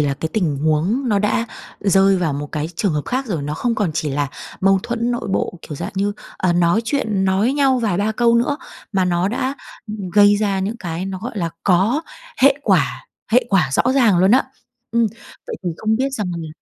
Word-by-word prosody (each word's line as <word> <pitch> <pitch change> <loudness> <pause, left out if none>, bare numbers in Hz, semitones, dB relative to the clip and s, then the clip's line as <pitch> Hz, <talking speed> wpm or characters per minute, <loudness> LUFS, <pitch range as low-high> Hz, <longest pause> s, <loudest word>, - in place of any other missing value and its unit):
là 145 -1 +1
cái 160 - -4
tình 170 -10 0
huống 160 - 0
nó 205 -3 +2
đã 210 +3 0 0.3
rơi 195 -1 +4
vào 170 -5 0
một 145 +1 -4
cái 150 +1 -2
trường 195 -2 +1
hợp 150 -1 -1
khác 260 +2 -2
rồi, 175 -10 -2
nó 145 +1 -3
không 235 +8 -1
còn 205 -6 0
chỉ 150 -2 -1
là 145 0 -1 0.3
mâu 195 0 +4
thuẫn 240 0 -2
nội 240 -3 -3
bộ 180 - -1
kiểu 150 - -7
dạng - - -5
như, 200 +1 0 0.3
à, 185 -2 +2
nói 175 +4 +3
chuyện 220 -7 0
nói 195 +6 +2
nhau 275 -2 +3
vài 215 -7 0
ba 210 +3 0
câu 235 +1 +3
nữa, 245 +5 +2 0.4
mà 190 -2 +2
nó 180 +1 +1
đã, 255 +5 -2 0.3
ừm, 210 -4 -6
gây 205 +1 +6
ra 200 -2 0
những 205 +5 -2
cái 175 -2 -4
nó, 190 -1 -4
gọi 230 +2 -6
là, 170 -3 -1
có 200 - +3 0.4
hệ 275 +1 +7
quả - - +1 0.3
hệ 250 +1 +5
quả 180 - +2
rõ - - +3
ràng 225 -10 +4
luôn 190 +2 +4
á. 255 +4 +5 0.5
Ừm, 230 0 +2 0.4
vậy - - -5
thì 175 - 0
không 220 +3 0
biết 265 +3 0
rằng 215 -6 -2
là 165 -1 -6
200 Hz, 225 wpm, -20 LUFS, 175-235 Hz, 0.5 s, hệ